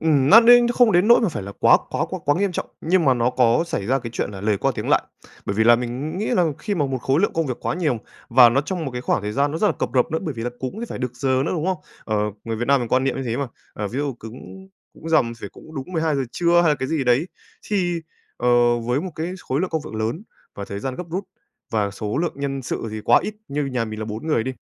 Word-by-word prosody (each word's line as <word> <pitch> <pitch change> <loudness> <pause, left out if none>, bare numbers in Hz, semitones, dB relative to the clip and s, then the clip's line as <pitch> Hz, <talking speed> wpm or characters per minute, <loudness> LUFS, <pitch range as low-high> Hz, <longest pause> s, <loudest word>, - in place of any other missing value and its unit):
Ừm, 145 -4 +3
nó 225 - +10
đến 240 +1 +7
không 240 -3 +4
đến 180 +5 +3
nỗi 235 - +7
mà 220 - +2
phải 150 - -5
là 100 +1 -7
quá - - +7
quá - - 0
quá - - -4
quá 145 - +3
nghiêm 200 -2 0
trọng, - - -3
nhưng 170 +1 +2
mà 130 -2 +4
nó 120 +1 +1
có 125 +4 +3
xảy 100 -10 -3
ra 135 +2 +2
cái 115 -2 -7
chuyện 105 - -2
là 95 -2 -8
lời 105 0 +1
qua - - +1
tiếng - - -4
lại. - - +4 0.4
Bởi 100 - -1
vì 110 - +3
là 120 0 +7
mình 130 +8 -4
nghĩ 215 - -2
là 180 - +2
khi 205 -2 -2
mà 145 -5 0
một 130 -1 -2
khối 135 +5 +2
lượng 205 - +1
công 165 -2 0
việc 125 - -3
quá - - -2
nhiều 150 -10 0 0.3
và 120 0 +7
nó 130 +4 +2
trong 170 +1 -4
một 135 - -3
cái 125 - -5
khoảng 120 - 0
thời 105 0 -3
gian 145 +3 +1
nó 160 - -2
rất 210 - +2
là - - +3
cập - - -3
rập 125 +2 +2
nữa, 160 - 0
bởi 150 -5 -4
vì 115 - -5
là 120 - -2
cúng 130 - -3
thì 235 - -4
phải - - -6
được 125 -1 -3
giờ 130 0 +1
nữa, - - -1
đúng 165 0 -2
không? 190 -1 +1 0.3
Ờ, 110 -1 -1 0.3
người 115 -1 -3
Việt 120 - -2
Nam 140 -2 +4
mình 120 - -3
quan 130 +2 +2
niệm 135 - 0
như 135 - -3
thế 120 -1 -2
mà, 140 -1 -2 0.3
ờ, 105 -1 -4
ví 125 +7 -4
dụ 145 -3 -2
cứng 130 - -11 0.3
cúng 165 - -9
rằm 120 -8 +3
phải 100 - -6
cúng 160 +10 -15
đúng 140 +6 -6
12:00 160 -4 0
trưa 175 0 +3
hay 170 - +3
là 150 - +4
cái 130 - -4
gì 155 -5 0
đấy. 125 +7 +3 0.4
Thì, 180 -4 +1 0.4
ờ, 120 0 +3
với 125 +4 -1
một 185 +2 -5
cái 165 +3 -3
khối 135 +4 -2
lượng 185 - -1
công 160 -2 -1
việc - - -8
lớn 110 - -2 0.3
và 100 - -6
thời 100 0 -6
gian 130 +2 -3
gấp 180 - -5
rút 190 +3 -3 0.5
và 105 -3 0
số 105 +6 -4
lượng 170 0 0
nhân 135 -1 -3
sự 115 - -4
thì 110 - -5
quá 120 - +6
ít, 215 - -4
như 145 +1 -1
nhà 125 -3 -1
mình 110 -1 -6
là 110 - -3
4 110 +7 -6
người 135 -8 +1
đi, 130 - -2
135 Hz, 300 wpm, -22 LUFS, 120-165 Hz, 0.5 s, nó